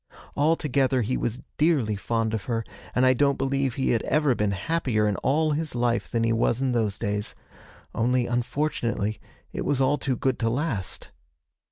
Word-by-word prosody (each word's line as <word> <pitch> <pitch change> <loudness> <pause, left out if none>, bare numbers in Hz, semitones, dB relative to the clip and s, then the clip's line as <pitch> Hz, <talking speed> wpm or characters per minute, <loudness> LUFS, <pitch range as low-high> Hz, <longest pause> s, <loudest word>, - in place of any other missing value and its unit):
Altogether 140 -4 +2
he 125 +5 -1
was 120 +2 -3 0.2
dearly 145 -9 +2
fond 110 +2 -1
of 105 -3 -3
her, 115 -2 -2 0.3
and 125 - +4
I 130 - +6
don't 140 +1 +2
believe 135 -2 0
he 130 - +1
had 115 -2 +2
ever 150 -3 +2
been 105 -3 0
happier 110 - 0
in 105 - +1
all 155 +3 +1
his 150 -2 -2
life 120 -1 0
than 115 -1 0
he 115 0 +2
was 115 +1 +1
in 135 -1 +1
those 110 -5 0
days. 105 -1 -3 0.6
Only, 125 +1 +1
unfortunately, 120 -4 -1 0.3
it - - -3
was 140 - 0
all 135 +2 +2
too 130 -2 -1
good 130 0 0
to 115 - +1
last.' 120 - -3
125 Hz, 180 wpm, -26 LUFS, 115-140 Hz, 0.6 s, I